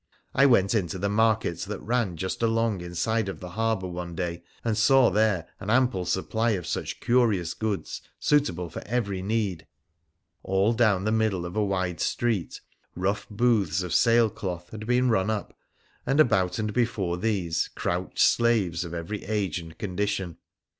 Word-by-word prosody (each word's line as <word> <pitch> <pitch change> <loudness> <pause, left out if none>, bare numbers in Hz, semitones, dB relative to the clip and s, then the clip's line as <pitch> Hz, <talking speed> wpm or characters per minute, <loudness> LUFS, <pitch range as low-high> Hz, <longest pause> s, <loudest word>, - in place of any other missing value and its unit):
I 140 +1 +5
went 100 -6 +4
into 95 -5 -1
the 100 +2 -1
market 110 -5 +1
that 100 0 -4
ran 115 -7 -1
just 95 +7 -3
along 115 -4 +1
inside 100 +6 -1
the 95 -2 -6
harbour 110 -1 -1
one 90 -1 -6
day, 85 -1 -3 0.2
and 115 -2 +1
saw 130 +3 +5
there 105 -6 +1
an 100 - -6
ample 120 -6 +2
supply 110 +6 0
of 90 - -7
such - - -3
curious 110 -9 +2
goods 110 -3 -3 0.2
suitable 140 - +1
for 80 - -7
every 100 -5 -1
need. 100 -5 -2 0.7
All 95 +4 +2
down 110 -5 +2
the 110 - 0
middle 110 -5 +1
of 85 - -7
a 105 - +2
wide 95 -4 -1
street 115 -8 -1 0.3
rough 100 +3 -2
booths 105 -6 +1
of 90 - -4
sail 115 -1 +4
cloth 90 -3 -6
had 110 0 -7
been 125 +1 +3
run 95 -1 +1
up, 110 -2 -3 0.5
and 135 +3 0
about 95 -11 +3
and 105 -1 -2
before 105 -7 0
these 95 -6 0
crouched 90 +1 -3
slaves 100 -8 +3
of 85 0 -6
every 85 +5 -5
age 100 -5 -1
and 80 -1 -11
condition. 100 -3 -2
100 Hz, 165 wpm, -26 LUFS, 90-115 Hz, 0.7 s, I